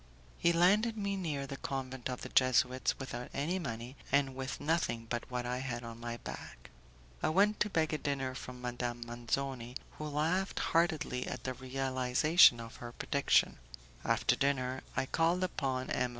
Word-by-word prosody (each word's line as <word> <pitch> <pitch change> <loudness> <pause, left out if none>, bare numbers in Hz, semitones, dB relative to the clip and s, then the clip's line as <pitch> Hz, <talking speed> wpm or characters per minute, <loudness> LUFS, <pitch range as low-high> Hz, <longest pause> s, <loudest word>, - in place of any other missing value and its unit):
He 170 - +4
landed 205 +7 +4
me 200 -1 -1
near 155 -7 -2
the 135 0 -6
convent 130 -2 -4
of 125 - -4
the - - -6
Jesuits, 130 -1 +3
without 125 -2 -6
any 165 +7 0
money, 120 -4 -5 0.2
and 140 -1 +2
with 135 +1 -4
nothing 145 -7 0
but 120 +2 -3
what 125 -1 -2
I 125 +1 -1
had 120 -2 -4
on 115 0 -8
my 120 0 -4
back. - - -9 0.5
I - - +2
went 200 +6 +3
to 210 - +2
beg 160 -4 +1
a 155 - 0
dinner 135 -3 -1
from 125 -1 -8
Madame 120 -1 -3
Manzoni, 120 +1 -3 0.2
who 155 - -3
laughed 160 +6 0
heartily 160 -7 +1
at 125 - -5
the 130 - -2
realization 130 +2 +4
of 115 0 -8
her 120 -1 -7
prediction. 140 +3 +2 0.4
After - - +2
dinner 130 -2 0 0.2
I - - +2
called 165 +6 +2
upon 135 -7 -2
M. 125 -1 +1
130 Hz, 170 wpm, -33 LUFS, 125-155 Hz, 0.5 s, He